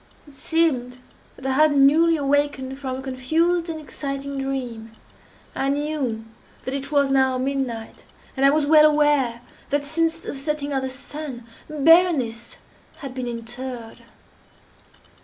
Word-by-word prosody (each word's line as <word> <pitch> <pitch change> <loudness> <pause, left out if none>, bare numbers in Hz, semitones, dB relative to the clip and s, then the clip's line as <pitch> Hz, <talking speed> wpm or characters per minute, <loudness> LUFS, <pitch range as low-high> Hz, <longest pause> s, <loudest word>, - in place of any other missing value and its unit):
It 290 - -15
seemed 270 -5 0 0.4
that 265 - -13
I 265 - +1
had 295 +2 +4
newly 320 +4 +5
awakened 280 -2 0
from 260 -2 -4
a 260 - -6
confused 325 +7 0
and 320 -1 -4
exciting 275 -1 -5
dream. 245 -5 -5 0.6
I 270 - -1
knew 280 -6 -2 0.4
that 260 - -3
it 275 +1 -4
was 280 -2 +3
now 265 -1 +3
midnight, 255 -4 -3 0.3
and 270 - -1
I 275 - +7
was 300 +1 +2
well 305 0 +7
aware, 295 -6 +2 0.3
that 285 0 0
since 330 +2 0
the - - -6
setting 290 +1 -3
of 270 - 0
the 265 - -3
sun, 270 -1 -7 0.2
Berenice 300 -7 +3 0.4
had 275 -3 -6
been 255 -1 -4
interred. 240 0 -7
275 Hz, 140 wpm, -23 LUFS, 255-300 Hz, 0.6 s, I